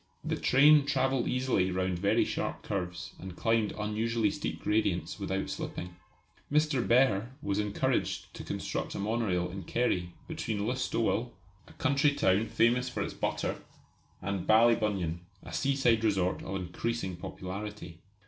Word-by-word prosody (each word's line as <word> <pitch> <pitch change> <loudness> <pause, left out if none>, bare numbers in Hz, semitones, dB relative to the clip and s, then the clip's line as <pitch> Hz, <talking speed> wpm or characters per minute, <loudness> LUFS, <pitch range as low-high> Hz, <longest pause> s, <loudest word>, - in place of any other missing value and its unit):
The - - -1
train 145 +2 +5
travelled 135 -3 +1
easily 125 -7 +1
round 95 -1 -1
very 100 +2 +3
sharp - - -3
curves 90 -3 -4
and 95 -2 -8
climbed 115 -1 +1
unusually 110 0 0
steep - - -4
gradients 105 -3 0
without 95 -1 -2
slipping. 90 0 -5 0.6
Mr. 150 -3 +3
Behr 120 -4 +3 0.2
was 100 0 0
encouraged 105 -1 -1
to - - -8
construct - - -3
a - - -3
monorail 100 -4 0
in 95 +1 -6
Kerry, 90 -3 -1
between 105 -2 -3
Listowel, 120 -1 0 0.3
a - - -15
country 145 0 +2
town 100 +1 +2
famous 125 +3 +2
for - - -2
its - - -5
butter, - - -2 0.6
and 100 -1 -2
Ballybunion, 105 -7 +3 0.2
a 90 - -9
seaside 120 +2 +2
resort 95 -4 +1
of 95 - -5
increasing 95 +2 -3
popularity. 95 0 -7
105 Hz, 140 wpm, -30 LUFS, 95-120 Hz, 0.6 s, train